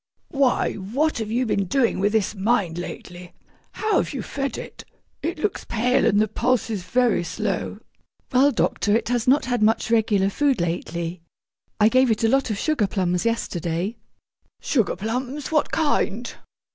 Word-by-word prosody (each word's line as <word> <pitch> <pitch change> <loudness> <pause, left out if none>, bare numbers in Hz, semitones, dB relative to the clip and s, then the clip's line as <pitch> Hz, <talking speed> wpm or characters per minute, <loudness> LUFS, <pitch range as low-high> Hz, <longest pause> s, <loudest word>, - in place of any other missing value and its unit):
'Why, 275 -3 +1
what 240 +10 -1
have 220 -2 -3
you 245 +3 0
been 200 -3 0
doing 235 +4 +1
with 205 +2 +2
this 220 -2 +1
mind 195 -5 0
lately? 175 0 -8 0.4
How 435 0 0
have - - -1
you - - -3
fed 275 -1 -3
it? - - -9 0.4
It 340 - -3
looks 380 +6 -2
pale, 250 +3 +1
and 205 - +3
the 215 - +3
pulse 235 +2 0
is 205 -4 -2
very 235 +1 +1
slow.' - - -3 0.6
'Well, 265 +3 +5
doctor, 205 -5 +1
it 230 - 0
has 245 0 0
not 275 +3 +4
had 245 -2 -1
much 220 +1 +2
regular 210 -4 +2
food 280 +1 +1
lately. 170 0 -3 0.6
I 210 - +6
gave 255 +2 +4
it 220 0 0
a 225 - +4
lot 270 +1 +2
of 215 - -2
sugar 285 -5 +1
plums 180 -1 -1
yesterday.' 180 -2 -2 0.6
'Sugar 230 -10 0
plums! 250 - -4
What 305 -2 +1
kind?' 245 -7 0
225 Hz, 170 wpm, -23 LUFS, 195-255 Hz, 0.6 s, I